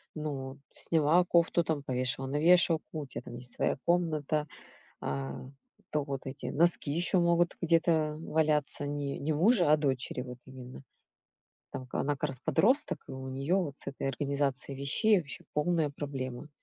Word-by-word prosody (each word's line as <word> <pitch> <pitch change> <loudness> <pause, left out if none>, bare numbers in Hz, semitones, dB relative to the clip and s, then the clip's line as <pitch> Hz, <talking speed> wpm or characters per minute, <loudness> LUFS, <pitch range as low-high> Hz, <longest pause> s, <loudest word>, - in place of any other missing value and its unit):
"Ну 140 -3 -5
сняла 165 +2 +3
кофту, 170 0 +3
там 160 -3 -1
повешала 130 0 -1
на 145 +2 -1
вешалку, 165 -1 +3
у 150 - -5
тебя 130 - -6
там - - -9
есть 120 0 -7
своя - - 0
комната". 155 -3 +1 0.6
А 70 -1 -3 0.5
то 150 -1 +1
вот 135 -2 -4
эти 135 +1 -7
носки 170 -1 +3
еще 175 +4 +2
могут 170 0 +2
где-то 165 -2 +2
валяться, 155 -3 +1
не 145 -1 -3
не 155 +2 -1
мужа, 175 +1 +4
а - - +6
дочери 135 -4 -1
вот 125 -1 -8
именно. 130 0 -10 0.9
Там 130 - -6
к - - -10
она 145 - +1
как 145 +1 -3
раз 130 -2 -6
подросток, 255 - +2
и - - -8
у 130 0 -6
нее 135 +7 0
вот 160 -7 -1
с - - -12
этой 140 0 -3
организацией 140 0 -2
вещей 200 +10 +3
вообще 145 -4 -9
полная 160 0 +1
проблема. 140 -1 -5
145 Hz, 165 wpm, -30 LUFS, 135-165 Hz, 0.9 s, а